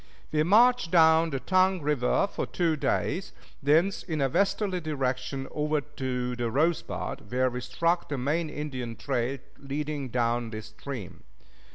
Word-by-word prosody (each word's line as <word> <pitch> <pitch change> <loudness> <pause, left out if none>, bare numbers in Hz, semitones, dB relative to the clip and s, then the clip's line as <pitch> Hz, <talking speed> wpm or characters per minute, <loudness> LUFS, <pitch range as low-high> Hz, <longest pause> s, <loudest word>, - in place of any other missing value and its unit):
We 150 - +2
marched 225 +4 +5
down 165 -1 +5
the 135 -3 -2
Tongue 185 +3 +3
River 145 +4 +2
for 200 - -4
two 170 -3 +1
days, 170 +5 -1 0.3
thence 160 +7 +3
in 160 -4 -3
a 135 -1 +2
westerly 195 +2 +1
direction 135 -3 -2
over 150 0 0
to 130 -4 -3
the 120 -1 -1
Rosebud, 150 -7 -1
where 130 0 +2
we 125 +1 -4
struck 165 +8 0
the 145 - -2
main 155 +6 0
Indian 130 -6 -5
trail 130 +2 -1 0.2
leading 140 0 -4
down 120 -1 0
this 110 -1 -7
stream. 115 -4 -8
145 Hz, 150 wpm, -28 LUFS, 125-165 Hz, 0.3 s, marched